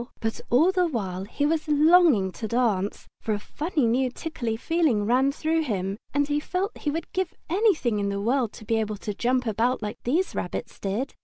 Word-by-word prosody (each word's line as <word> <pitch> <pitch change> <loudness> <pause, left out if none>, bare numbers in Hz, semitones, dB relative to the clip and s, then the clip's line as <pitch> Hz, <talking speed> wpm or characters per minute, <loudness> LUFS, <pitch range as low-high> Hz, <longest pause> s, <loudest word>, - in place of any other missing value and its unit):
But 225 0 -3
all 310 +10 +5
the 365 -2 +2
while 190 - -3
he 285 +7 -2
was 315 +1 0
longing 300 - +5
to 220 - -5
dance, 215 -4 0
for 220 - -1
a 205 - -2
funny 300 - -1
new 250 +3 +2
tickly 245 -5 -4
feeling 295 -7 +1
ran 255 +5 +3
through 320 +2 0
him, 195 -9 -2 0.2
and 285 0 +1
he 295 0 +1
felt 370 +7 -2
he 295 - -3
would 320 +2 -4
give 370 -2 -2 0.2
anything 345 - +2
in 200 0 0
the 200 0 -2
world 235 +2 +1
to 215 - -11
be 225 0 +1
able 215 -1 -2
to 210 +1 -4
jump 250 +4 0
about 230 +2 0
like 210 +1 -5
these 330 +10 0
rabbits - - -5
did. 210 +8 -2
250 Hz, 205 wpm, -26 LUFS, 215-315 Hz, 0.2 s, all